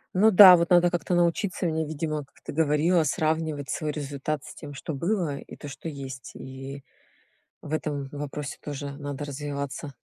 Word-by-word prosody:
Ну 215 +4 +6
да, 185 -3 +10
вот 170 0 0
надо 175 0 +6
как-то 175 +1 0
научиться 175 +2 +1
мне, 160 -1 0
видимо, 155 -1 -3
как 140 - -27
ты - - -6
говорила, 160 +3 +3
сравнивать 155 -1 -1
свой 155 -2 -1
результат 145 0 -3
с - - -10
тем, 145 -2 -9
что 145 +3 -5
было, 170 -2 -1
и - - -10
то, 145 - -9
что 150 - -8
есть. 135 -3 -7
И 135 +1 -8 0.8
в 150 - -8
этом 145 -3 -2
вопросе 145 0 -5
тоже 145 -1 -5
надо 145 0 -5
развиваться. 140 0 -5
150 Hz, 175 wpm, -26 LUFS, 140-165 Hz, 0.8 s, да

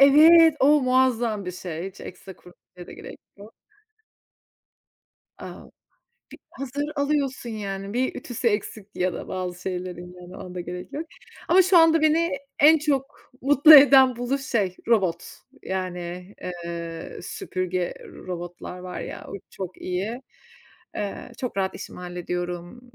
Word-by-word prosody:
Evet, 315 +3 +8
o 290 +2 +5
muazzam 245 -5 +1
bir 180 - -4
şey. 175 0 -6
Hiç 195 - -15
ekstra 185 +1 -10
kurutmaya 180 0 -16
da - - -11
gerek - - -10 0.2
yok. 205 +2 -13 1.9
A! - - -9 0.7
Bir - - -11
hazır 275 +2 -4
alıyorsun, 280 -4 -1
yani, 200 -2 -5
bir 255 +2 -1
ütüsü 240 -1 -2
eksik 210 -1 -3
ya 180 0 0
da - - -7
bazı 180 -1 -4
şeylerin, 180 -1 -5
yani, 180 +1 -11
ona 180 - -9
da 180 - -4
gerek 180 +1 -7
yok. 315 +3 -5 0.4
Ama 370 +2 +6
şu 365 -1 +5
anda 325 0 +5
beni, 325 +2 +3 0.3
en 315 +2 +7
çok 275 -3 -3
mutlu 290 +3 +8
eden 265 -3 +8
buluş 265 +3 -2
şey: 205 -8 -1
Robot. 185 -7 +2 0.4
Yani, 180 0 -5
eee, 170 -2 -6
süpürge 185 0 -3
robotlar 175 0 -8
var 180 0 -7
ya, - - -7
o - - -9 0.2
çok 185 -2 -7
iyi. 200 +7 -3 0.8
Eee, 210 +4 -5
çok 250 -6 -4
rahat 190 -1 -1
işimi - - -9
hallediyorum. 175 +3 -5
200 Hz, 140 wpm, -24 LUFS, 180-270 Hz, 1.9 s, Evet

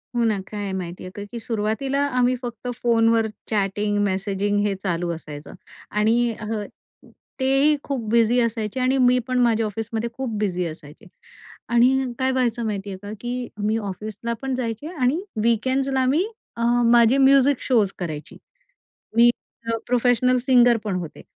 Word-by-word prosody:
हो 235 - +2
ना, 215 -3 +1
काय 210 -1 -4
आहे 200 - -3
माहिती 180 -2 -5
आहे 185 - -8
का? 205 - -5
की 235 - -5
सुरुवातीला, 230 +6 -1
आम्ही 250 +1 +3
फक्त, 240 -1 -6 0.2
फोनवर 225 -1 +3 0.2
चॅटिंग 205 0 0
मेसेजिंग 195 +1 0
हे 205 - +1
चालू 175 -2 -1
असायचं 150 -2 -10 0.4
आणि 230 +3 +2
ह 215 0 -3 0.8
तेही 270 +3 +3
खूप 250 -6 -3
बिझी 235 +1 +4
असायचे 230 +1 -2
आणि 255 +1 +2
मी 250 -1 +4
पण, 255 0 0
माझ्या 230 -2 +3
ऑफिसमध्ये 225 +2 -3
खूप 260 0 -4
बिझी 180 -4 -1
असायचे 155 -2 -11 0.7
आणि 250 +2 +3
काय 260 0 +2
व्हायचं, 240 -2 0
माहिती 205 -2 -3
आहे 190 - -6
का, 205 0 -7
की 245 0 -3
मी, 210 +2 0
ऑफिसला 215 +2 -5
पण 270 -1 -2
जायचे 235 +3 -4
आणि 285 +3 +1 0.2
वीकेंड्स 260 +4 +1
ला 265 - +2
अ, 255 - +2
मी 300 +8 +2 0.7
माझी 240 +2 +5
म्युझिक 275 0 +5
शोज 220 -7 +2
करायची. 155 -4 -6 0.8
मी 235 +1 +7 0.4
अ, 230 - 0
प्रोफेशनल 250 +1 +3
सिंगर 245 -2 +4
पण 205 -4 -2
होते. 165 -3 -8
230 Hz, 160 wpm, -23 LUFS, 205-255 Hz, 0.8 s, मी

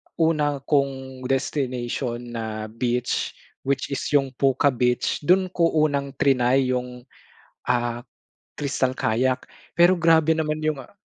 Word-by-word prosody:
una 150 -4 +1
kong 135 -2 -1
destination 125 -3 -2
na 110 -2 -5
beach 120 +1 -1 0.3
which 140 0 -1
is 140 - -1 0.2
yung 135 -2 +2
Puka 135 +1 +3
beach 125 -1 0
dun 185 0 +3
ko 170 -2 +2 0.2
unang 140 -2 -1
trinay 130 -1 +2
yung, 125 -1 -4 0.6
ah, 120 0 -1 0.5
crystal 135 -3 -1
kayak. 130 +2 0 0.2
Pero 175 +2 +5
grabe 160 -1 +4
naman 155 -1 -1
yung 155 -1 0
a - - -19
135 Hz, 125 wpm, -24 LUFS, 125-150 Hz, 0.6 s, Pero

